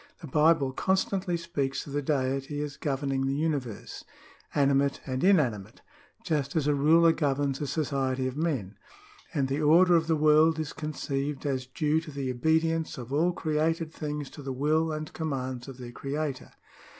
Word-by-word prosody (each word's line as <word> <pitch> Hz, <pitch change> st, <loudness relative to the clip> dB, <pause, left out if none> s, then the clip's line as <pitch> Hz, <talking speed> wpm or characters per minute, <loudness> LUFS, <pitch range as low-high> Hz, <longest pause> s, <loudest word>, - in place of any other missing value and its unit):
The -, -, -9 dB
Bible 150 Hz, -1 st, +3 dB
constantly 190 Hz, +3 st, 0 dB
speaks 150 Hz, -6 st, -3 dB
of 140 Hz, -, -9 dB
the 145 Hz, -, 0 dB
Deity 135 Hz, 0 st, -1 dB
as 145 Hz, -1 st, -6 dB
governing 135 Hz, -2 st, -1 dB
the 135 Hz, -, 0 dB
42 155 Hz, +3 st, 0 dB
OTHER 165 Hz, -, +2 dB
KINDS 130 Hz, -, -12 dB
OF -, -, -6 dB
LAW 115 Hz, -, -5 dB
[§15 -, -, -9 dB
universe, -, -, -10 dB, 0.5 s
animate 140 Hz, -1 st, +2 dB
and 130 Hz, 0 st, -3 dB
inanimate, 130 Hz, -, +2 dB, 0.4 s
just 150 Hz, -2 st, -1 dB
as 155 Hz, -3 st, +1 dB
a 150 Hz, -, +3 dB
ruler 160 Hz, +4 st, +5 dB
governs 140 Hz, -3 st, 0 dB
a 145 Hz, -, -2 dB
society 135 Hz, -2 st, -1 dB
of 130 Hz, 0 st, -3 dB
men; 130 Hz, -, -2 dB, 0.5 s
and 140 Hz, -4 st, 0 dB
the 140 Hz, +3 st, -1 dB
order 170 Hz, +4 st, +6 dB
of 165 Hz, -1 st, +2 dB
the 165 Hz, -, +3 dB
world 155 Hz, +1 st, +4 dB
is 155 Hz, -2 st, -4 dB
conceived 145 Hz, -2 st, -3 dB
as 130 Hz, -3 st, -1 dB
due 155 Hz, +3 st, 0 dB
to 165 Hz, -, -10 dB
the 140 Hz, -3 st, -3 dB
obedience 160 Hz, +5 st, +1 dB
of 125 Hz, +1 st, -7 dB
all 165 Hz, +5 st, +3 dB
created 160 Hz, 0 st, -1 dB
things 150 Hz, -2 st, -5 dB
to 150 Hz, -, -10 dB
the 135 Hz, -1 st, -5 dB
will 155 Hz, +5 st, +1 dB
and 155 Hz, 0 st, -5 dB
com 160 Hz, -2 st, -3 dB
mands 130 Hz, -2 st, -4 dB
of 135 Hz, -2 st, -9 dB
their 125 Hz, -2 st, -8 dB
Creator. 140 Hz, 0 st, -4 dB
145 Hz, 195 wpm, -28 LUFS, 135-160 Hz, 0.5 s, order